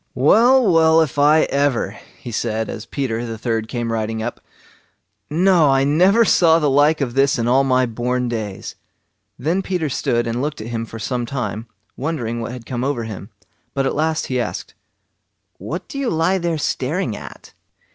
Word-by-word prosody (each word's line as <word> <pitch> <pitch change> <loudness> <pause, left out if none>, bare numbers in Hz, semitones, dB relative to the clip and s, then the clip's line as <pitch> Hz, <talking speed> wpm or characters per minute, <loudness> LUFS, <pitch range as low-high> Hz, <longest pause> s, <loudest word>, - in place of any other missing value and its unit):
"Well, 225 - +5
well, 160 0 +5
if 150 -2 -1
I 150 +2 +5
ever!" 140 -3 +1 0.3
he 120 - -8
said, 110 0 -2
as 110 - -8
Peter 120 -5 -3
the 115 -1 -5
third 115 -1 -2
came 120 -1 -3
riding 110 0 -2
up. 120 - -5 0.9
"No! 170 -1 +4
I 135 0 +3
never 185 +11 +4
saw 165 -5 +5
the 150 -4 +1
like 145 +3 +3
of 125 -4 -1
this 135 +1 +2
in 115 0 -1
all 130 +3 +4
my 130 -1 +2
born 125 +2 -2
days!" 110 -5 -5 0.6
Then 165 +9 0
Peter 180 -5 -2
stood 120 -2 0
and 115 +1 -2
looked 150 +1 -3
at 110 - -6
him 115 0 -3
for 115 - -9
some 120 +2 -3
time, 115 -4 -4 0.3
wondering 125 -6 -3
what 115 - -5
had 125 -2 -9
come 125 -1 -4
over 135 -3 -1
him; 105 -2 -8 0.5
but 135 -1 0
at - - 0
last 160 +1 0
he 130 -1 -2
asked: 120 - -4 0.9
"What - - -6
do 275 - -6
you 270 -3 0
lie 170 +4 +1
there 170 -2 -1
staring 150 - -2
at?" - - -11
135 Hz, 185 wpm, -20 LUFS, 115-160 Hz, 0.9 s, Well